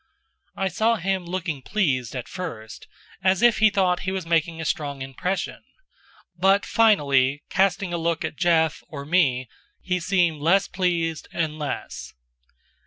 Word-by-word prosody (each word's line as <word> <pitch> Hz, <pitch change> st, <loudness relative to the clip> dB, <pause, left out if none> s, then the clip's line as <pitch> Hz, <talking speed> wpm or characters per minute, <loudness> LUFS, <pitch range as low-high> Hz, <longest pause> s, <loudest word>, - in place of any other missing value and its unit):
I 195 Hz, -, -1 dB
saw 220 Hz, +6 st, +1 dB
him 190 Hz, -2 st, -2 dB
looking 175 Hz, -5 st, -3 dB
pleased 135 Hz, -, -1 dB
at 125 Hz, -, -5 dB
first, 115 Hz, -12 st, -7 dB, 0.4 s
as 190 Hz, +2 st, +2 dB
if 240 Hz, -2 st, +5 dB
he 220 Hz, 0 st, +6 dB
thought 185 Hz, -3 st, +1 dB
he 185 Hz, -, -3 dB
was 190 Hz, -2 st, -3 dB
making 165 Hz, 0 st, 0 dB
a 160 Hz, -, -4 dB
strong 140 Hz, -4 st, -2 dB
impression; 155 Hz, +9 st, -3 dB, 0.7 s
but, 195 Hz, +3 st, +3 dB
finally, 145 Hz, -, +3 dB
casting 190 Hz, -1 st, +1 dB
a 170 Hz, -, -1 dB
look 165 Hz, 0 st, -1 dB
at -, -, -5 dB
Jeff, 160 Hz, -2 st, +2 dB
or 140 Hz, -2 st, -8 dB
me, 140 Hz, -7 st, +2 dB, 0.3 s
he 180 Hz, -1 st, -1 dB
seemed 175 Hz, -4 st, +1 dB
less 190 Hz, +6 st, +3 dB
pleased 170 Hz, -4 st, -1 dB
and 155 Hz, -2 st, -2 dB
less. 145 Hz, -2 st, -5 dB
170 Hz, 150 wpm, -24 LUFS, 150-190 Hz, 0.7 s, he